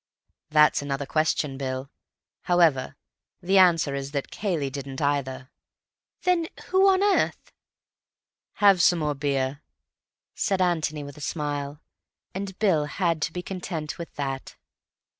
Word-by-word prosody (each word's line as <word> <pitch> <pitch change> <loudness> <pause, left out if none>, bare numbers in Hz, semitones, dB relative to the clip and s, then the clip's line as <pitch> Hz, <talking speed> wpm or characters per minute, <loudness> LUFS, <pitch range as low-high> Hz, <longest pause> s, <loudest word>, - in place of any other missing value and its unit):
"That's 150 -1 +4
another 140 0 -3
question, 150 -2 0
Bill. 130 0 -4 0.6
However, 165 -7 +3 0.4
the 190 +2 +3
answer 165 -6 +4
is 140 +1 -5
that 140 -2 -3
Cayley 165 -10 -2
didn't, 135 -1 -6
either." 140 -2 -1 0.7
"Then 350 -3 +2 0.2
who 380 +1 +5
on 380 0 +3
earth—" 410 -1 +1 1.0
"Have 200 -3 +5
some 175 - +5
more 150 -2 0
beer," 140 0 -1 0.7
said 195 -2 0
Antony 160 -4 0
with 145 0 -10
a - - -11
smile. 145 0 -3 0.5
And 190 0 -5
Bill 175 -9 +2
had 165 0 -1
to 155 - 0
be 180 +1 -5
content 175 -5 -5
with 170 - -8
that. 135 -2 -4
150 Hz, 130 wpm, -25 LUFS, 140-180 Hz, 1.0 s, who